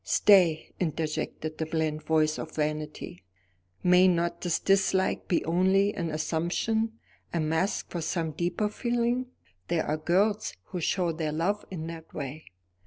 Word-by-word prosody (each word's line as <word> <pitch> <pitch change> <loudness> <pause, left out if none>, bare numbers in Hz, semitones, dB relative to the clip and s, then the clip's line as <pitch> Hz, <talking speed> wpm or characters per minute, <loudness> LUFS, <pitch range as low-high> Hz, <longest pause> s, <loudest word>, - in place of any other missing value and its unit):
"Stay," 180 -6 +4
interjected 155 -1 -3
the 160 - 0
bland 155 -1 -1
voice 155 0 +1
of 160 - -7
Vanity; 150 - -3 0.6
"may 180 +1 +6
not 170 -1 +1
this 175 -2 +1
dislike 195 -1 +2
be 175 - +1
only 190 +5 +3
an 170 -2 -3
assumption, 175 +8 -1 0.4
a 170 - -1
mask 160 +5 0
for 175 - -3
some 165 0 -1
deeper 175 +7 -1
feeling? 240 +3 0 0.4
There 165 -2 0
are 150 - 0
girls 195 +7 +1
who 180 - -6
show 175 +1 +1
their 160 -1 -2
love 175 +7 0
in 165 -4 -5
that 165 -1 -9
way. 145 +2 -5
170 Hz, 145 wpm, -28 LUFS, 155-190 Hz, 0.6 s, may